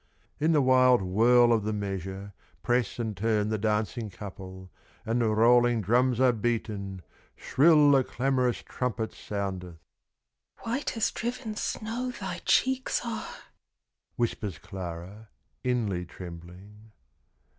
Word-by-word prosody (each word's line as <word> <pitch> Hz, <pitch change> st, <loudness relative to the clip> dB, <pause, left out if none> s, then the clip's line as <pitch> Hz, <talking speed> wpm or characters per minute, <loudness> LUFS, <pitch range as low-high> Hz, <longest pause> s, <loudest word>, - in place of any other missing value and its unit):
In 155 Hz, +2 st, +2 dB
the 150 Hz, -3 st, +4 dB
wild 130 Hz, -3 st, +5 dB
whirl 120 Hz, +6 st, +4 dB
of 110 Hz, -2 st, +1 dB
the 110 Hz, +1 st, -2 dB
measure, 95 Hz, -1 st, -5 dB, 0.3 s
Press 120 Hz, -3 st, 0 dB
and 110 Hz, -3 st, -3 dB
turn 105 Hz, +1 st, 0 dB
the 110 Hz, -1 st, -1 dB
dancing 110 Hz, +2 st, -1 dB
couple, 95 Hz, -1 st, -10 dB, 0.3 s
And 115 Hz, +2 st, 0 dB
the 115 Hz, -, +2 dB
rolling 120 Hz, +2 st, +4 dB
drums 120 Hz, +4 st, +2 dB
are 130 Hz, -1 st, +5 dB
beaten, 105 Hz, -5 st, -3 dB, 0.3 s
Shrill 150 Hz, 0 st, +4 dB
the 135 Hz, -2 st, +5 dB
clamorous 125 Hz, -1 st, 0 dB
trumpet 115 Hz, -3 st, -3 dB
soundeth. 95 Hz, -4 st, -5 dB, 0.9 s
"White 240 Hz, +1 st, -2 dB
as 225 Hz, -, +1 dB
driven 235 Hz, -2 st, -4 dB
snow 230 Hz, +4 st, -3 dB
thy 250 Hz, -, -6 dB
cheeks 260 Hz, 0 st, +2 dB
are!" 230 Hz, -2 st, -5 dB, 0.8 s
Whispers 105 Hz, -7 st, -2 dB
Clara, 90 Hz, +4 st, -8 dB, 0.3 s
inly 105 Hz, -9 st, -1 dB
trembling. 90 Hz, +6 st, -12 dB
110 Hz, 120 wpm, -28 LUFS, 100-125 Hz, 0.9 s, wild